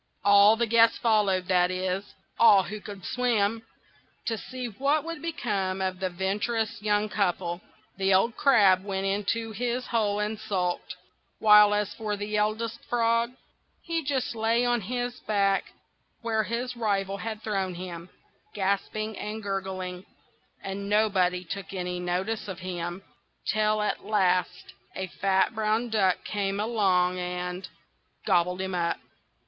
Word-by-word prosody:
All 200 Hz, +1 st, +7 dB
the 235 Hz, +1 st, +1 dB
guests 230 Hz, 0 st, +4 dB
followed,—that 190 Hz, -5 st, +2 dB
is, 185 Hz, +2 st, -3 dB, 0.2 s
all 205 Hz, -4 st, +7 dB
who 210 Hz, +2 st, -7 dB
could 200 Hz, -2 st, -9 dB
swim,—to 225 Hz, -1 st, -2 dB
see 255 Hz, +3 st, -6 dB
what 275 Hz, +7 st, 0 dB
would 330 Hz, -1 st, -6 dB
become 205 Hz, -, -2 dB
of 185 Hz, -1 st, -2 dB
the 190 Hz, -1 st, -1 dB
venturous 205 Hz, +4 st, -2 dB
young 210 Hz, 0 st, +1 dB
couple. 180 Hz, -4 st, -1 dB, 0.4 s
The 195 Hz, 0 st, +1 dB
old 195 Hz, +5 st, +3 dB
Crab 200 Hz, -9 st, +5 dB
went 195 Hz, -1 st, -3 dB
into 210 Hz, +3 st, -1 dB
his 245 Hz, +3 st, -2 dB
hole 210 Hz, -3 st, 0 dB
and 210 Hz, +1 st, -2 dB
sulked; 185 Hz, -5 st, -2 dB, 0.4 s
while 210 Hz, -1 st, +7 dB
as 210 Hz, -1 st, -1 dB
for 210 Hz, -2 st, -3 dB
the 205 Hz, +1 st, -3 dB
Eldest 220 Hz, +2 st, -1 dB
Frog, 230 Hz, 0 st, +1 dB, 0.5 s
he 330 Hz, -1 st, -2 dB
just 270 Hz, -3 st, -1 dB
lay 230 Hz, +2 st, +1 dB
on 240 Hz, -1 st, +1 dB
his 245 Hz, +4 st, -3 dB
back 200 Hz, -2 st, +2 dB, 0.6 s
where 225 Hz, -1 st, +1 dB
his 245 Hz, +3 st, -3 dB
rival 200 Hz, -4 st, -1 dB
had 220 Hz, +1 st, -5 dB
thrown 195 Hz, -4 st, -2 dB
him, 175 Hz, -1 st, -7 dB, 0.5 s
gasping 205 Hz, +2 st, -1 dB
and 215 Hz, +1 st, -5 dB
gurgling, 190 Hz, -2 st, -4 dB, 0.6 s
and 200 Hz, +1 st, -5 dB
nobody 190 Hz, -4 st, +2 dB
took 195 Hz, +2 st, -6 dB
any 180 Hz, -1 st, -3 dB
notice 185 Hz, +5 st, -2 dB
of 190 Hz, -3 st, -5 dB
him, 175 Hz, 0 st, -5 dB, 0.4 s
till 215 Hz, 0 st, +1 dB
at 210 Hz, -, -2 dB
last 185 Hz, -4 st, 0 dB, 0.2 s
a 190 Hz, -, -2 dB
fat 190 Hz, +2 st, +1 dB
brown 220 Hz, +2 st, 0 dB
duck 195 Hz, -4 st, +2 dB
came 200 Hz, -1 st, -2 dB
along, 190 Hz, -5 st, +2 dB
and—gobbled 180 Hz, 0 st, -3 dB
him 190 Hz, 0 st, -3 dB
up! 170 Hz, -1 st, 0 dB
205 Hz, 135 wpm, -27 LUFS, 190-225 Hz, 0.6 s, All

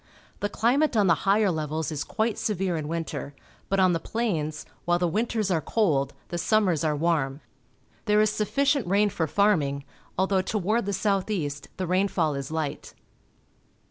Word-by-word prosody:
The 205 Hz, -, -1 dB
climate 250 Hz, +5 st, +2 dB
on 205 Hz, -, +4 dB
the 175 Hz, -, +5 dB, 0.2 s
higher 205 Hz, -1 st, +4 dB
levels 155 Hz, 0 st, -2 dB
is 145 Hz, -2 st, -2 dB
quite 220 Hz, 0 st, -1 dB
severe 190 Hz, -4 st, -1 dB
in 155 Hz, -2 st, -3 dB
winter, 155 Hz, -4 st, -4 dB, 0.3 s
but 195 Hz, -, +1 dB
on 185 Hz, -1 st, +4 dB
the 165 Hz, -, 0 dB
plains, 160 Hz, -9 st, -2 dB, 0.2 s
while 175 Hz, 0 st, +2 dB
the 175 Hz, 0 st, +1 dB
winters 215 Hz, +2 st, 0 dB
are 165 Hz, -3 st, +2 dB
cold, 145 Hz, -, +1 dB
the 175 Hz, -, -3 dB
sum 215 Hz, +4 st, +3 dB
mers 165 Hz, -5 st, +1 dB
are 155 Hz, -2 st, +1 dB
warm. 150 Hz, -3 st, 0 dB, 0.6 s
There 210 Hz, -1 st, +3 dB
is 215 Hz, 0 st, +4 dB
sufficient 275 Hz, +3 st, +1 dB
rain 205 Hz, +2 st, +3 dB
for 160 Hz, -3 st, -1 dB
farming, 150 Hz, -8 st, +2 dB, 0.3 s
although 190 Hz, 0 st, +2 dB
toward 210 Hz, +3 st, 0 dB
the -, -, 0 dB
south 195 Hz, 0 st, 0 dB
east 145 Hz, -8 st, -3 dB
the 185 Hz, -, -2 dB
rainfall 180 Hz, -3 st, +1 dB
is 140 Hz, -1 st, -4 dB
light. 155 Hz, -2 st, -4 dB
185 Hz, 175 wpm, -26 LUFS, 155-210 Hz, 0.6 s, the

